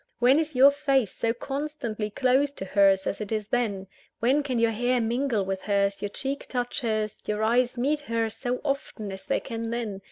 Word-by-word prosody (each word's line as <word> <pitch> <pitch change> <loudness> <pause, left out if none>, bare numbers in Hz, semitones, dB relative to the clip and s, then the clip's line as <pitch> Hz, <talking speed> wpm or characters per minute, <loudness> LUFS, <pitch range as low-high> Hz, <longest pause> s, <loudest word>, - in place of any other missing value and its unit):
When 255 +5 +5
is 315 -3 -2
your 270 +3 +8
face 275 -6 +1
so 230 - 0
constantly 245 -4 -4
close 260 +5 +2
to 190 - -5
hers 195 0 +4
as 200 - -2
it 210 - -5
is 215 -1 -2
then? 210 -6 0 0.3
when 260 +6 +3
can 265 -4 -2
your 230 0 +3
hair 245 +3 +1
mingle 235 -2 0
with 190 0 -3
hers, 200 -1 0
your 205 - -2
cheek 275 +6 -4
touch 245 +2 -2
hers, 215 -3 -1
your 210 0 -1
eyes 245 +3 +2
meet 285 +5 +1
hers, 230 -6 -2
so 250 -1 -3
often 275 -7 -3
as 190 0 -8
they - - +1
can 230 -2 -5
then? 225 -4 -3
235 Hz, 200 wpm, -26 LUFS, 210-265 Hz, 0.3 s, your